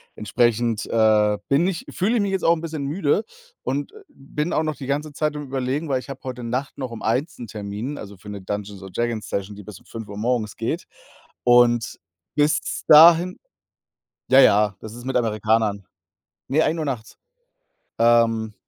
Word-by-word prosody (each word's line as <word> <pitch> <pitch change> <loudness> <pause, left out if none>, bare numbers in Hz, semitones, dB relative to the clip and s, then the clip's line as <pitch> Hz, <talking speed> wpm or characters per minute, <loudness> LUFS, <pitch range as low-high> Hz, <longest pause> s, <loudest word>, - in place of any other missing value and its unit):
Entsprechend, 115 +1 0
äh, 105 -2 +3
bin 140 +5 +3
ich 185 -3 -3
fühle 210 +6 0
ich - - +2
mich 200 -1 -1
jetzt 190 -1 -1
auch 165 - +5
'n 160 - -7
bisschen 160 -3 -4
müde 155 +6 +1 0.4
und 140 +2 -2 0.2
bin 150 +4 -4
auch 155 - +1
noch 155 -1 -2
die 135 - -8
ganze 145 +2 -2
Zeit 150 +1 -1
am 150 - -5
Überlegen, 135 +3 -2
weil 130 -2 +1
ich 130 - -12
habe 135 -1 -7
heute 125 -2 -6
Nacht 125 +4 -3
noch 130 -3 -5
um 115 - -8
1:00 130 +9 -1
'n 120 - -7
Termin, 105 +7 -5
also, 100 -1 -9
für 105 +2 -12
'ne 100 -1 -7
Dungeons 100 0 -5
und 95 -1 -11
Dragons 120 -2 -2
Session, 100 +1 -3
die 105 - -10
bis 100 -1 -11
5:00 105 -3 -8
morgens 110 -1 -1
geht. - - -3 0.6
Und 120 -1 +4 0.4
bis 150 +1 0
dahin 170 +4 +7 0.9
ja, 130 - +8
ja, 105 -5 +5
das 110 - -9
ist 120 0 -10
mit 130 - -3
Amerikanern. 110 -3 0 0.6
Ne, 150 +4 +2
1:00 160 0 0
nachts. 120 -5 -5 0.8
Ähm, 115 -1 +3
120 Hz, 180 wpm, -23 LUFS, 110-145 Hz, 0.9 s, ja